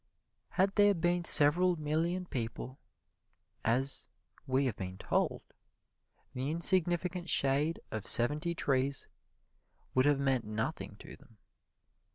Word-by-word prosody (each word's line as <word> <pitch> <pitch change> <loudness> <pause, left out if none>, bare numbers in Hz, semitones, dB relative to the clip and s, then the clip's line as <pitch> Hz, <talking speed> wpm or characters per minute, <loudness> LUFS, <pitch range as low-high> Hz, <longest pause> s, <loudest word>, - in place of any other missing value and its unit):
Had 195 +1 +2
there 205 -1 +5
been 175 +1 0
several 175 +4 +5
million 165 +4 -2
people, 125 -1 -5 0.8
as 130 +4 0 0.4
we 135 +1 +1
have 125 -6 -1
been 95 0 -7
told, - - -1 0.9
the 130 +2 -3
insignificant 175 +1 +2
shade 140 +4 +2
of 110 -2 -5
seventy 150 +8 +1
trees 135 -2 0 0.9
would 130 +2 +3
have 145 -1 +2
meant 135 -3 0
nothing 110 +1 -4
to - - -12
them. 130 -5 -22
145 Hz, 115 wpm, -31 LUFS, 130-170 Hz, 0.9 s, there